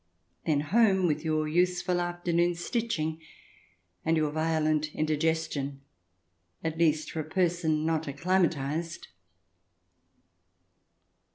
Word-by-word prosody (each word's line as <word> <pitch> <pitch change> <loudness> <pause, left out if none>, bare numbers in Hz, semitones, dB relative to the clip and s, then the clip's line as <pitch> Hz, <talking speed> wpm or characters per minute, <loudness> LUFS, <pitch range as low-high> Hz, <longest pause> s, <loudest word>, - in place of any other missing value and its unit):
Then 150 -3 +3
home 190 +3 +3
with 155 -2 0
your 155 -1 0
useful 180 +2 +1
afternoon's 175 0 0
stitching 165 -10 -1 0.8
and 165 0 +2
your 155 -1 +1
violent 155 -1 0
indigestion 155 -3 -1 0.4
— 85 +1 -42
at 160 0 -3
least 155 -2 +2
for 160 - -4
a - - -1
person 165 -2 0
not 160 -1 0
acclimatized. 165 0 -1
160 Hz, 100 wpm, -29 LUFS, 155-175 Hz, 0.8 s, Then